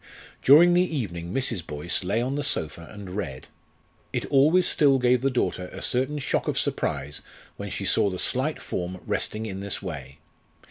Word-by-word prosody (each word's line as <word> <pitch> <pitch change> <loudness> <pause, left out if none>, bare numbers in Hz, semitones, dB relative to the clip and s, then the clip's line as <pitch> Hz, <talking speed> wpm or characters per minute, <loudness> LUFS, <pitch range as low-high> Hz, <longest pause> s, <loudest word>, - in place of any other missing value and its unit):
During 165 +6 +7
the 175 - +5
evening 100 - -3
Mrs. 115 -6 -1
Boyce 75 +5 -2
lay 105 +6 0
on 130 +2 -2
the 145 - -1
sofa 80 - -2
and 100 -3 -8
read. 75 -11 -5 0.6
It - - -2
always 155 +6 +5
still 140 -3 +4
gave 125 -1 +3
the 135 - +2
daughter 90 -8 -1
a - - -7
certain 130 +4 0
shock 140 - -1
of - - 0
surprise 75 -1 -1 0.4
when - - -5
she - - -4
saw 100 - +4
the 90 - -4
slight 130 - 0
form 90 +1 -4
resting 110 +1 -2
in 95 -3 -5
this 100 0 -2
way. 70 -8 -7
105 Hz, 180 wpm, -26 LUFS, 90-135 Hz, 0.6 s, During